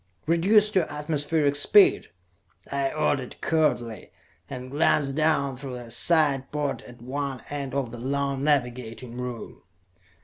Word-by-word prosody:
"Reduce 205 Hz, +6 st, +4 dB
to 185 Hz, -5 st, +1 dB
atmospheric 150 Hz, 0 st, 0 dB
speed," 195 Hz, +8 st, +5 dB, 0.6 s
I 140 Hz, -1 st, 0 dB
ordered 140 Hz, -4 st, -1 dB
curtly, 120 Hz, -, -1 dB, 0.4 s
and 130 Hz, -1 st, -7 dB
glanced 145 Hz, -2 st, +2 dB
down 140 Hz, -3 st, +1 dB
through 135 Hz, -1 st, -7 dB
a 120 Hz, -2 st, -8 dB
side 140 Hz, 0 st, +2 dB
port 145 Hz, -2 st, -2 dB
at 120 Hz, -1 st, -13 dB
one 135 Hz, +1 st, -4 dB
end 140 Hz, -2 st, -4 dB
of 135 Hz, -4 st, -2 dB
the 120 Hz, -, -8 dB
long 140 Hz, +1 st, -2 dB
navigating 125 Hz, -4 st, -1 dB
room. 125 Hz, -1 st, -7 dB
140 Hz, 130 wpm, -25 LUFS, 125-150 Hz, 0.6 s, speed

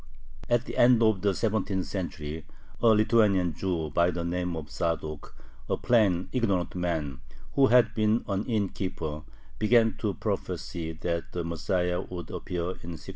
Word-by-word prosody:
At 120 Hz, 0 st, +2 dB
the -, -, -6 dB
end 120 Hz, -1 st, +6 dB
of 110 Hz, -4 st, +3 dB
the 100 Hz, 0 st, +3 dB
seventeenth 100 Hz, -2 st, -1 dB
century, 80 Hz, -5 st, -5 dB, 0.4 s
a 120 Hz, -, +4 dB
Lithuanian 105 Hz, -5 st, +4 dB
Jew 80 Hz, -3 st, -2 dB
by 85 Hz, +4 st, +3 dB
the 85 Hz, -1 st, -3 dB
name 90 Hz, 0 st, -2 dB
of 75 Hz, -3 st, -7 dB
Zadok, 80 Hz, -3 st, -3 dB, 0.3 s
a -, -, +1 dB
plain, 100 Hz, -7 st, +2 dB
ignorant 100 Hz, -8 st, 0 dB
man, 80 Hz, -7 st, -2 dB, 0.3 s
who 135 Hz, -1 st, +5 dB
had 125 Hz, -1 st, +5 dB
been 110 Hz, +1 st, +1 dB
an 100 Hz, +1 st, -1 dB
innkeeper, 95 Hz, -8 st, -2 dB, 0.4 s
began 115 Hz, 0 st, +4 dB
to -, -, -1 dB
prophesy 80 Hz, -1 st, -3 dB
that 85 Hz, +1 st, -3 dB
the 90 Hz, -, -2 dB
Messiah 90 Hz, +2 st, -1 dB
would 85 Hz, -3 st, -7 dB
appear 90 Hz, -1 st, -4 dB
in 85 Hz, -2 st, -8 dB
1695. 75 Hz, -, -12 dB
90 Hz, 155 wpm, -28 LUFS, 85-110 Hz, 0.4 s, end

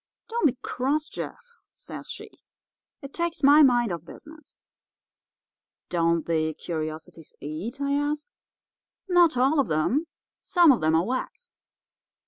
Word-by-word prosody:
"'Don't 460 Hz, -7 st, +2 dB
be 255 Hz, -2 st, -2 dB
cross, 290 Hz, +5 st, -1 dB
Jeff,' 475 Hz, -1 st, -8 dB
says -, -, -9 dB
she; -, -, -8 dB, 0.7 s
'it 275 Hz, -, -9 dB
takes 340 Hz, -2 st, -3 dB
my 290 Hz, +2 st, +8 dB
mind 240 Hz, -6 st, +4 dB
off 170 Hz, -2 st, -4 dB
business.' 305 Hz, -, -14 dB, 1.3 s
"'Don't 170 Hz, -2 st, +1 dB
the 160 Hz, -2 st, 0 dB
curiosities 155 Hz, -1 st, -6 dB
eat?' 165 Hz, -, -6 dB
I 280 Hz, 0 st, -1 dB
ask. 290 Hz, +1 st, -1 dB, 0.8 s
"'Not 350 Hz, -6 st, +4 dB
all 270 Hz, +5 st, +3 dB
of 275 Hz, -, +2 dB
them. 230 Hz, -, 0 dB, 0.3 s
Some 350 Hz, -5 st, +5 dB
of 250 Hz, -, +1 dB
them 155 Hz, +1 st, +2 dB
are 165 Hz, +2 st, +2 dB
wax. 470 Hz, -, -5 dB
265 Hz, 130 wpm, -26 LUFS, -, 1.3 s, my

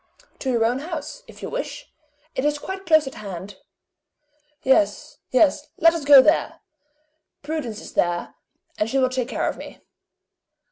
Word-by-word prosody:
"To 265 Hz, -, -3 dB
your 230 Hz, -2 st, +2 dB
own 245 Hz, +3 st, 0 dB
house, 335 Hz, -, -6 dB
if -, -, -14 dB
you -, -, -4 dB
wish -, -, -5 dB, 0.4 s
it 260 Hz, -, -2 dB
is 295 Hz, 0 st, +1 dB
quite 380 Hz, +5 st, -7 dB
close 315 Hz, -2 st, +5 dB
at 265 Hz, -, -6 dB
hand." 195 Hz, -1 st, -8 dB, 1.1 s
"Yes. 265 Hz, +4 st, +1 dB
Yes. 290 Hz, +2 st, +3 dB
Let 330 Hz, 0 st, +5 dB
us 325 Hz, -4 st, -4 dB
go 280 Hz, -2 st, +9 dB
there! 310 Hz, +4 st, +1 dB, 0.8 s
Prudence 285 Hz, -8 st, -4 dB
is -, -, -11 dB
there, 175 Hz, 0 st, 0 dB, 0.5 s
and 210 Hz, -, 0 dB
she 270 Hz, -, 0 dB
will 260 Hz, -1 st, +3 dB
take 255 Hz, -2 st, -2 dB
care -, -, -2 dB
of -, -, -3 dB
me.". -, -, -10 dB
270 Hz, 160 wpm, -23 LUFS, 235-315 Hz, 1.1 s, go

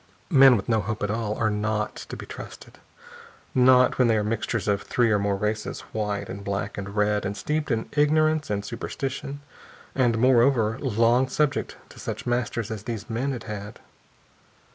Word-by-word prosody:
Men 135 Hz, -3 st, +8 dB
with 95 Hz, -, -5 dB
no 110 Hz, -2 st, +2 dB
hope 110 Hz, +2 st, -4 dB
at 105 Hz, -, 0 dB
all 105 Hz, -1 st, -2 dB
are 110 Hz, -2 st, +1 dB
not 105 Hz, 0 st, -1 dB
to -, -, -6 dB
be -, -, -8 dB
trusted. -, -, -10 dB, 0.7 s
Not 125 Hz, 0 st, +5 dB
when 125 Hz, -, +5 dB
they 110 Hz, -1 st, +3 dB
are 105 Hz, -, +1 dB
mixtures 110 Hz, +1 st, -2 dB
of 100 Hz, 0 st, +1 dB
three 120 Hz, -2 st, +1 dB
or 105 Hz, -, +3 dB
more 100 Hz, 0 st, 0 dB
races 105 Hz, +2 st, -3 dB
white 105 Hz, -2 st, -2 dB
and 100 Hz, +1 st, -7 dB
black 100 Hz, +1 st, -3 dB
and 100 Hz, 0 st, -6 dB
red 105 Hz, 0 st, +1 dB
and 100 Hz, +1 st, -3 dB
steeped 150 Hz, 0 st, -2 dB
in 115 Hz, -3 st, -1 dB
ignorance 155 Hz, +1 st, +2 dB
and 100 Hz, -1 st, -2 dB
superstition 135 Hz, +4 st, -5 dB, 0.5 s
and, 120 Hz, -4 st, +2 dB
moreover, 120 Hz, -1 st, +3 dB
long 120 Hz, 0 st, +2 dB
subject 145 Hz, +1 st, 0 dB
to -, -, -14 dB
such -, -, -5 dB
masters 120 Hz, -2 st, -1 dB
as 110 Hz, -1 st, -6 dB
these 115 Hz, -1 st, -5 dB
men 130 Hz, +5 st, -1 dB
had 125 Hz, -4 st, -5 dB
had. 105 Hz, -1 st, -7 dB
115 Hz, 180 wpm, -25 LUFS, 105-130 Hz, 0.7 s, Men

